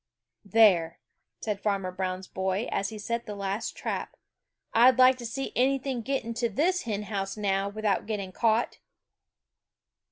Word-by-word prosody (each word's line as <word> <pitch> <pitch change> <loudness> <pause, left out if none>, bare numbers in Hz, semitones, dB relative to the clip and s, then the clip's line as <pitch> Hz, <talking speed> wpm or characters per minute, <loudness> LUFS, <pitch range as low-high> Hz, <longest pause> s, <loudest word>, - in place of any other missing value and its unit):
"There," 185 -6 +4 0.4
said 210 -3 -2
Farmer 195 -3 -1
Brown's 185 0 -3
boy, 190 +3 -2
as 195 - -1
he 220 - -8
set 235 +3 -3
the 210 - -5
last 200 +2 -3
trap, - - -4 0.6
"I'd 245 +2 +6
like 255 0 +7
to 240 - -5
see 270 +4 -4
anything 265 0 +1
get 270 +4 -1
into 230 +1 -1
this 335 - +1
hen 210 -2 -2
house 195 -1 -3
now 195 -1 0
without 210 -1 -1
getting 200 -4 -3
caught!" 225 +3 +1
215 Hz, 150 wpm, -28 LUFS, 195-235 Hz, 0.6 s, like